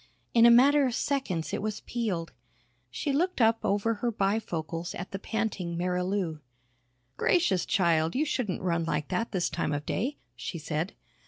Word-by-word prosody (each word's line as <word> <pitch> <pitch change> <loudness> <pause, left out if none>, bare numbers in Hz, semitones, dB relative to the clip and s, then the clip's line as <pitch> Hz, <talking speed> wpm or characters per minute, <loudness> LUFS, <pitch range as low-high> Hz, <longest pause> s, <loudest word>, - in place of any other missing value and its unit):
In 235 0 +7
a - - +8
matter 275 +4 +6
of 245 - -2
seconds 210 - -1
it - - -1
was 215 0 -3
peeled. 200 -9 -3 0.6
She 280 - -2
looked 355 +4 +1
up 225 -1 +4
over 205 +3 +1
her 235 +2 -1
bifocals 180 -6 -2
at 180 - -6
the 195 - -4
panting 205 -6 -2
Marilou. 180 -1 -1 0.8
"Gracious, 195 - +2
child, 165 -3 +2
you 295 +4 +2
shouldn't 225 - -2
run 170 -2 +1
like 150 -2 -2
that 195 +5 -1
this 180 -3 0
time 155 -1 -2
of 145 0 -3
day," 270 +7 -2 0.2
she 135 +8 -5
said. 155 +3 -3
195 Hz, 165 wpm, -28 LUFS, 170-230 Hz, 0.8 s, a